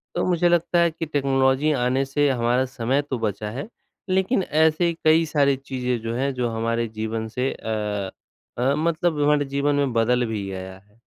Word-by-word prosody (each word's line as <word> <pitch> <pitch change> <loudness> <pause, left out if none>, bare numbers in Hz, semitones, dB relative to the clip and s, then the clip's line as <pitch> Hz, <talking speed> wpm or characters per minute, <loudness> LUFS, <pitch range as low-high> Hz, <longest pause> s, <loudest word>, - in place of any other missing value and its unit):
तो - - 0
मुझे 175 -1 +2
लगता 175 0 +2
है 170 -1 +3
कि 165 +1 -5
टेक्नोलॉजी 135 0 +1
आने 130 +2 +1
से 145 +1 +1
हमारा 125 +1 +1
समय 130 +5 +1
तो 130 -4 -2
बचा 105 -1 -2
है, 140 - -5 0.4
लेकिन 190 +3 +1
ऐसे 160 +2 +2
कई 160 +1 +5
सारी 140 -2 +3
चीज़ें 125 -3 -3
जो 115 +1 -3
हैं 135 +2 -1
जो 125 -2 -1
हमारे 115 +1 -1
जीवन 110 0 -2
से 130 +2 +1
अ 105 -3 -3 0.5
अ, 130 +3 +2
मतलब 160 0 0
हमारे 145 0 +3
जीवन 145 +1 +1
में 140 -4 0
बदल 120 +2 +2
भी 105 -3 -3
गया 95 0 -7
है। 105 +3 -30
135 Hz, 185 wpm, -23 LUFS, 115-155 Hz, 0.5 s, कई